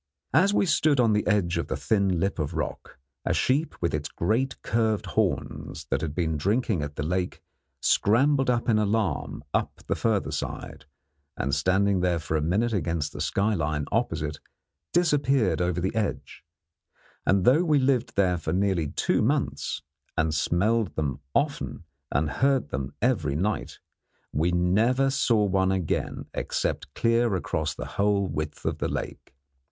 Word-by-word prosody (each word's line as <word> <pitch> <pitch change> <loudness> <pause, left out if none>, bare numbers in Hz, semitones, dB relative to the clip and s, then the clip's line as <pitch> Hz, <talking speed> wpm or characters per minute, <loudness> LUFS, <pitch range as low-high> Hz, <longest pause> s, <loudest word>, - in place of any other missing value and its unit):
As 190 +5 +5
we 205 - +2
stood 155 -5 +3
on 115 -3 +4
the 105 - 0
edge 90 -5 +2
of 80 - -3
the - - -2
thin 100 -5 +1
lip 95 0 -1
of 75 - -2
rock, - - -4 0.3
a - - 0
sheep 145 +5 0
with 85 - +1
its 75 +1 -2
great 120 +9 -1
curved 110 -2 +1
horns - - -2
that 70 +1 +1
had 80 -2 -3
been 80 -3 0
drinking 105 - +1
at 75 0 -5
the - - -3
lake 90 +3 -2 0.4
scrambled 135 +5 +3
in 120 -2 +2
alarm 105 -7 -1
up - - -1
the - - 0
further - - 0
side, - - -5 0.5
and, 70 +1 -1
standing 95 +5 +2 0.2
for 80 0 -3
a 75 - +1
minute 105 +9 +1
against 85 -6 -1
the - - -6
skyline 80 -8 0
opposite, 75 -1 -1 0.5
disappeared 140 - +2
over 90 0 0
the 95 +4 -1
edge; 110 -6 -3 0.8
and 95 -1 +2
though 145 +8 +5
we 155 -4 +3
lived 130 -3 +1
there 90 -3 +2
for 80 - -3
nearly 95 -4 +1
two - - 0
months, - - -1 0.3
and 80 0 +1
smelled 100 +7 +1
them 70 -3 -2 0.2
often - - -1 0.3
and 70 +3 +1
heard 135 - +3
them 65 0 -3
every 90 - +1
night, 95 +4 -2 0.6
we 80 +4 +2
never 110 +10 +2
saw 115 -5 +2
one 95 -1 +2
again 95 -4 -2
except - - -2
clear 115 -2 +2
across 80 -3 -2
the - - -5 0.2
whole 100 -1 +2
width 75 -4 -4
of - - -1
the - - -1
lake. - - -6
95 Hz, 155 wpm, -26 LUFS, 80-115 Hz, 0.8 s, As